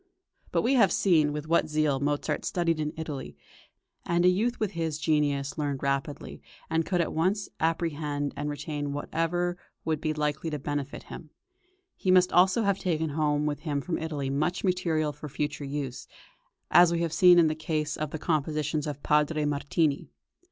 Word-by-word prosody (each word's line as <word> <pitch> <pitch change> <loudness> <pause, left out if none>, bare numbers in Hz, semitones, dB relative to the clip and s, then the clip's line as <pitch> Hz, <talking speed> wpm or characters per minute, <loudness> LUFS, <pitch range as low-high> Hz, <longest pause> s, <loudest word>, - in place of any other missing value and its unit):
But - - +1
we 250 - +2
have 230 -7 +5
seen 160 -6 +3
with 150 +1 -5
what 165 -1 +2
zeal 150 -3 +1
Mozart 145 +1 -1
studied 165 -3 0
in 150 -1 -1
Italy; 155 -4 -6 0.7
and 175 +1 +1
a - - +7
youth 225 +7 0
with 215 -3 -1
his 165 -3 -2
genius 150 -2 0
learned 145 -2 -2
rapidly, 140 +1 -3 0.3
and 160 0 +2
could 180 -2 +1
at 165 - -2
once 190 +6 0
apprehend 150 -3 -1
and 145 +1 -3
retain 145 0 -4
whatever 170 +4 -1 0.3
would 155 -2 -1
be 155 - 0
likely 150 +1 -2
to 150 - -3
benefit 145 0 -4
him. - - -10 0.7
He 185 - -3
must 185 0 +5
also 185 +5 +4
have 200 -1 +1
taken 160 -4 -1
home 150 0 +1
with 145 -1 -1
him 150 -2 -2
from 165 +4 -3
Italy 145 -4 -3
much 155 +6 -1
material 170 -5 0
for 150 - -9
future 145 +1 -3
use, 135 -2 -5 0.6
as 175 -1 +7
we 170 0 0
have 165 -2 -1
seen 180 +1 +7
in 170 - +6
the 155 - +2
case 155 -1 -2
of 155 -1 -3
the 160 - -5
compositions 150 -1 -1
of 145 -1 -6
Padre 150 0 +2
Martini. 145 +1 0
155 Hz, 180 wpm, -28 LUFS, 145-170 Hz, 0.7 s, a